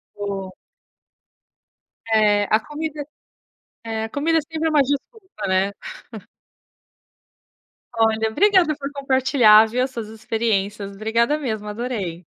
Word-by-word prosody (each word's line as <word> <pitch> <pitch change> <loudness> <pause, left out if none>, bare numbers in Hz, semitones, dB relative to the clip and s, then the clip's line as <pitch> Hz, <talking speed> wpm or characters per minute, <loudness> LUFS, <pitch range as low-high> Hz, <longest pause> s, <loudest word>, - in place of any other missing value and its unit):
O 195 -2 -5 1.6
É, 210 -2 +3
a 215 - +4
comida 295 +3 -6 0.8
é 220 -1 -3
a - - -4
comida 315 +7 +1
sempre 320 +1 -3
é - - -1
uma 300 -2 +4
desculpa, 285 - -5
né. 190 +1 +2 2.3
Olha, 220 0 +2
obrigada 370 - +3
por 280 -1 -6
compartilhar, 260 -5 +5
viu? 245 +3 -1
As 260 - -3
suas 230 -4 -6
experiências. 215 -2 -2
Obrigada 230 +7 +1
mesmo, 220 -7 -4
adorei. 210 -6 -4
225 Hz, 110 wpm, -21 LUFS, 210-285 Hz, 2.3 s, compartilhar